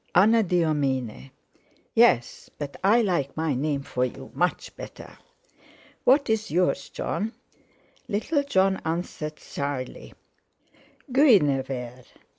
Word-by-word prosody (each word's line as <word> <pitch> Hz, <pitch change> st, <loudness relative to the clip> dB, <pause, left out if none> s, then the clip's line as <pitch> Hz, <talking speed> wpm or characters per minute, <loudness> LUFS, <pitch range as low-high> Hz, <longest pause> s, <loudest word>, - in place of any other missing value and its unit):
Anadyomene." 160 Hz, -, +2 dB, 0.6 s
"Yes! 225 Hz, -, +3 dB
but 145 Hz, -2 st, -6 dB
I 225 Hz, +5 st, +5 dB
like 155 Hz, -9 st, -1 dB
my 160 Hz, -2 st, 0 dB
name 140 Hz, +1 st, -1 dB
for 125 Hz, -2 st, -2 dB
you 130 Hz, +1 st, -5 dB
much 180 Hz, +1 st, -1 dB
better." -, -, -11 dB, 0.9 s
"What 275 Hz, +3 st, +5 dB
is 220 Hz, 0 st, 0 dB
yours, 180 Hz, +3 st, 0 dB
Jon?" 220 Hz, +3 st, -3 dB, 0.7 s
Little 285 Hz, +9 st, 0 dB
Jon 190 Hz, -8 st, +2 dB
answered 160 Hz, -2 st, -4 dB
shyly: 140 Hz, -3 st, -5 dB, 1.0 s
"Guinevere! 135 Hz, -, +2 dB
160 Hz, 95 wpm, -25 LUFS, 135-210 Hz, 1.0 s, I